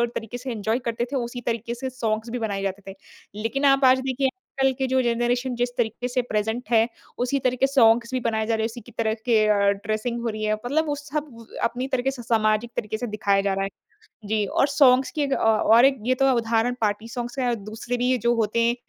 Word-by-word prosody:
तरीके 225 +2 -5
से 255 +1 -6
इन्जॉय 220 +2 -1
करते 235 +1 -2
थे - - -2
उसी 245 -1 -3
तरीके 235 0 -2
से 260 +2 -4
सॉन्ग्स 225 -2 -2
भी 245 - -3
बनाए 200 -3 -2
जाते 195 0 -4
थे। - - -13 0.5
लेकिन 275 +6 -1
आप 275 -1 +5
आज 260 0 +6
देखिए 265 0 +1 0.3
कल 270 - +4
के 265 - 0
जो 260 0 +2
जनरेशन 245 +1 0
जिस 245 +1 0
तरीके 235 +1 -1
से 250 0 0
प्रेज़ेन्ट 220 +2 -2
है 225 -1 +4 0.4
उसी 275 +3 0
तरीके 255 +1 +1
सॉन्ग्स 235 -3 +4
भी 255 - +1
बनाए 220 -2 -1
जा 225 - +1
रहे 220 - -1
हैं - - +2
उसी 240 +1 -9
की 240 - -15
तरह 220 -1 +1
के 225 -3 +4
अ, 210 - +5 0.2
ड्रेसिंग 215 +4 -3
हो 235 - -1
रही 215 0 -5
है। 215 - +1
मतलब 280 +9 -1
वो 290 - 0
सब 290 -5 -6 0.2
अपनी 250 +3 -1
तरीके 265 0 0
से 260 - -8
सामाजिक 220 0 +1
तरीके 215 0 -3
से 245 - -4
दिखाया 200 -2 +1
जा 200 0 0
रहा 195 0 -1
है। 195 - -2 0.6
जी 215 0 +1
और 275 +8 +1
सॉन्ग्स 265 -2 +4
की 305 - -2
एक 280 -1 -1
अ, - - +3
और 225 +2 +4
एक 270 -1 +4
ये 255 - +3
तो 270 +1 +2
है 270 - +4
उदाहरण 230 +1 +1
पार्टी 215 +1 -1
सॉन्ग्स 240 +2 -5
का 265 - -1
है 245 - +1
और 240 - +2
दूसरे 220 +3 -5
भी 245 +1 0
ये 255 - +2
जो 235 +2 +2
होते 220 0 0
हैं, 235 +1 +3
235 Hz, 250 wpm, -24 LUFS, 220-255 Hz, 0.6 s, आज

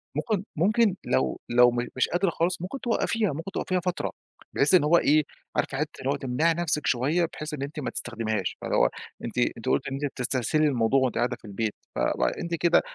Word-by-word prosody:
ممكن 215 -5 -1
ممكن 210 +4 +3
لو 65 0 0
لو 120 0 +6
م 120 0 -2
مش 130 - +2
قادرة 180 +2 +1
خالص، 170 +1 -1
ممكن 190 +10 -5
توقّفيها، 225 - 0
ممكن 165 +6 -6
توقّفيها 185 -1 -1
فترة 180 0 -2 0.4
بحيث 145 +5 +3
إن 175 - +7
هو 165 +3 +5
إيه، 155 -1 +4 0.3
عارفة 135 - 0
حِتّة 150 +2 -3
اللي 135 - -2
هو 140 - +2
تمنَعي 140 +5 +1
نَفسِك 160 -2 -1
شوية 145 +8 +2
بحيث 155 0 -6
إن 145 - -4
أنتِ 145 +2 -5
ما 140 - -2
تستخدميهاش، 110 -2 -2
فاللي - - -1
هو - - +4 0.4
أنتِ - - -6 0.2
أنتِ - - -4
قُلتِ 70 - +1
إن 135 - -4
أنتِ 140 +2 -2
بتستهسلي 135 +3 +1
الموضوع 130 -1 +2
وأنتِ 130 -2 0
قاعدة 120 +1 0
في - - -18
البيت، 105 +1 -2 0.2
ف - - -2
فأنتِ 60 - 0
كده 170 +1 +4
145 Hz, 210 wpm, -26 LUFS, 120-170 Hz, 0.4 s, إن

